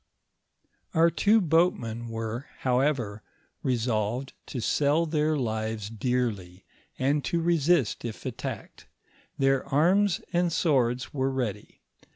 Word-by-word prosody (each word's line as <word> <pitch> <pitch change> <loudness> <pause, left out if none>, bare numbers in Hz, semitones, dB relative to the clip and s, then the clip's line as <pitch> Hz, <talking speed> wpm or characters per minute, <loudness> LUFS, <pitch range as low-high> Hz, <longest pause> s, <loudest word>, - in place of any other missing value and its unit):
Oar 165 +1 +5
two 215 +5 +4
boatmen 160 - +1
were, 115 +4 -4 0.2
howovor, 125 -5 +1 0.4
resolved 120 0 -1
to 130 - -4
sell 145 +7 +2
their 155 -1 +1
livet 110 -3 -3
dearly, 105 -7 -2 0.3
and 140 +2 +1
to 170 - 0
resist 165 - +2
if 115 -2 -6
attacked; - - -6 0.5
their 135 -1 +2
arms 175 +7 +3
and 175 0 +2
swords 130 -7 +1
were 135 -1 0
ready. 120 -6 -4
130 Hz, 110 wpm, -27 LUFS, 115-155 Hz, 0.5 s, Oar